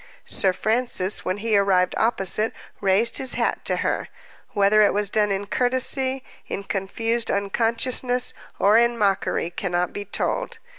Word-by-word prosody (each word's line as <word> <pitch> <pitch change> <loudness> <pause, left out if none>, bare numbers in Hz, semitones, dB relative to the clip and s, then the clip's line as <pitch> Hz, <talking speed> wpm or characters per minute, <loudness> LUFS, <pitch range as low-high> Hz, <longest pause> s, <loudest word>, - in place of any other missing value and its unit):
Sir 190 - +2
Francis, 215 -1 0
when 185 +2 -2
he 220 +1 0
arrived 195 -2 +2
opposite, 215 -1 +1 0.3
raised 200 +4 +2
his 260 - +2
hat - - -1
to - - 0
her. - - -1 0.5
Whether 205 +1 +4
it 205 - +3
was 205 -1 0
done 210 -2 +1
in 195 +1 -2
courtesy, 260 +3 0 0.2
in 200 - -5
confused 225 +4 -2
unconsciousness, 235 +5 0 0.2
or 210 +3 +4
in 235 0 +2
mockery, 195 -4 0
cannot 175 -1 -2
be 205 - -6
told. 450 - -3
210 Hz, 145 wpm, -23 LUFS, 195-235 Hz, 0.5 s, Whether